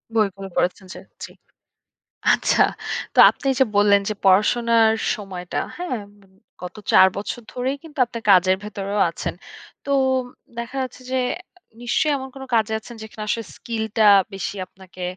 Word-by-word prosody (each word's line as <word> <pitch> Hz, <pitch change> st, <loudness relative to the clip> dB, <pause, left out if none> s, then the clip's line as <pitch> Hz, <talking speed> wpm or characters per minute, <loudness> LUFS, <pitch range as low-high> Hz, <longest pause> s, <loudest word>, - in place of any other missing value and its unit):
বইগুলো 195 Hz, -3 st, 0 dB
পড়েনছেন 185 Hz, +1 st, -1 dB
ছে -, -, -10 dB, 0.2 s
জি। -, -, -7 dB, 1.0 s
আচ্ছা! -, -, +2 dB, 0.5 s
তো -, -, +1 dB
আপনি -, -, -6 dB
যে -, -, +7 dB
বললেন 205 Hz, 0 st, +5 dB
যে -, -, -1 dB
পড়াশোনার 225 Hz, +3 st, +4 dB, 0.2 s
সময়টা, 190 Hz, -5 st, -7 dB, 0.2 s
হ্যাঁ, 350 Hz, -10 st, -3 dB, 0.6 s
গত 180 Hz, -, -7 dB, 0.2 s
৪ 190 Hz, -, +8 dB
বছর 210 Hz, +4 st, -5 dB
ধরেই 260 Hz, +3 st, -2 dB
কিন্তু 310 Hz, -3 st, -11 dB
আপনার 230 Hz, -1 st, -8 dB
কাজের 185 Hz, 0 st, +5 dB
ভেতরেও 205 Hz, 0 st, -4 dB
আছেন। -, -, -5 dB, 0.5 s
তো 280 Hz, -, -3 dB, 0.7 s
দেখা 235 Hz, +3 st, -6 dB
যাচ্ছে 255 Hz, -1 st, -6 dB
যে, 260 Hz, -, +1 dB, 0.6 s
নিশ্চয়ই 265 Hz, +5 st, +1 dB
এমন 265 Hz, 0 st, -7 dB
কোনো 270 Hz, -, -8 dB
কাজে 220 Hz, -1 st, +1 dB
আছেন 235 Hz, +2 st, -12 dB
যেখানে 220 Hz, 0 st, -8 dB
আসলে 230 Hz, +1 st, -1 dB
স্কিলটা 220 Hz, -2 st, -2 dB, 0.3 s
বেশি 195 Hz, +1 st, -4 dB
আপনাকে 185 Hz, -1 st, -12 dB
220 Hz, 140 wpm, -22 LUFS, 195-240 Hz, 1.0 s, ৪